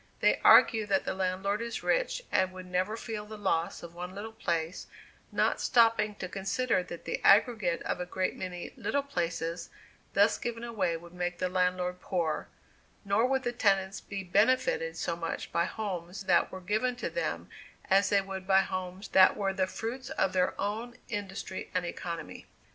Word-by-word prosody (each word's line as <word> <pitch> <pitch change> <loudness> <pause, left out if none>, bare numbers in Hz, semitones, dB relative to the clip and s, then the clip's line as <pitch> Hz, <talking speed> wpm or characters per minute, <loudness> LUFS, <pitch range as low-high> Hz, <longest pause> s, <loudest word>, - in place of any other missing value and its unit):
They - - +3
argue 220 -4 +7
that 195 -1 +1
the - - -1
landlord 190 +3 -1
is 235 0 -4
rich - - +1
and 185 0 +2
would 185 0 -8
never 185 +4 -1
feel 215 -2 -5
the 215 0 -8
loss 175 -6 -1
of 170 0 -9
one 180 +2 -7
little 215 +3 -6
place, 170 -5 -2 0.4
not - - +1
stopping 225 -4 +3
to 185 - -5
consider 195 +4 0
that 170 -1 -9
the - - -3
aggregate 200 -4 +4
of - - -2
a 180 - -4
great 185 +1 -1
many 180 -1 -6
"little 285 0 -1
places" 170 -8 -3 0.5
thus 205 +2 +4
given 235 -1 -4
away 210 -8 -1
would 170 +1 -14
make 175 0 -2
the 185 - -1
landlord 180 0 0
poor, 170 -4 -1 0.6
nor 200 +5 +3
would 265 0 +1
the 240 - 0
tenants 195 -4 +1
be 200 -1 -6
benefited 260 - +2
so 170 - -1
much 165 -1 -4
by 170 0 +2
homes 190 -3 -5
that 185 -2 +3
were 185 - -7
given 215 +7 0
to 245 - -4
them - - -2 0.4
as 195 +1 +4
they 200 -1 +4
would 190 -1 -7
by 190 0 +6
homes 185 +1 -5
that 190 -1 +6
were 195 -2 0
the 190 -1 +1
fruits 245 +6 -5
of 190 - 0
their 180 -1 +1
own 225 +4 -3
industry 200 -3 -5
and 180 -1 +1
economy. 170 -1 -6
195 Hz, 180 wpm, -30 LUFS, 180-220 Hz, 0.6 s, argue